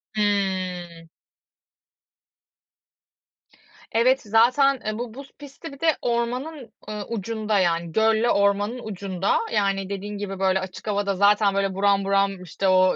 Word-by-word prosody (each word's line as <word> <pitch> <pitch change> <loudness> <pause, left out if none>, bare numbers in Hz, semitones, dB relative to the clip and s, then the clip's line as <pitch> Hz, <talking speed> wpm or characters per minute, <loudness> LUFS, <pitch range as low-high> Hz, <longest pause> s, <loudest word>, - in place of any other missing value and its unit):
Hıı. 185 -5 -1 2.8
Evet, 255 +4 +3
zaten, 250 +5 +3
e, 215 0 -2
bu 240 -2 -5
buz 275 +2 -11
pisti 285 +1 -10
bir 275 - -13
de 320 -1 +3
ormanın, 245 +3 -2 0.2
ııı, 210 -1 -5
ucunda. 220 -1 -1
Yani 170 -2 0
gölle 220 +3 +2
ormanın 200 +4 +1
ucunda. 195 -2 -1
Yani 195 -1 0
dediğin 200 +1 -5
gibi, 195 -1 -5
böyle, 190 0 +2
açık 190 +3 -8
havada 200 -1 0
zaten, 200 +1 +4
böyle, 195 -1 0
buram 200 0 +2
buram, 195 -1 +1
işte, 185 +2 -3
o 185 0 +4
205 Hz, 130 wpm, -24 LUFS, 195-230 Hz, 2.8 s, zaten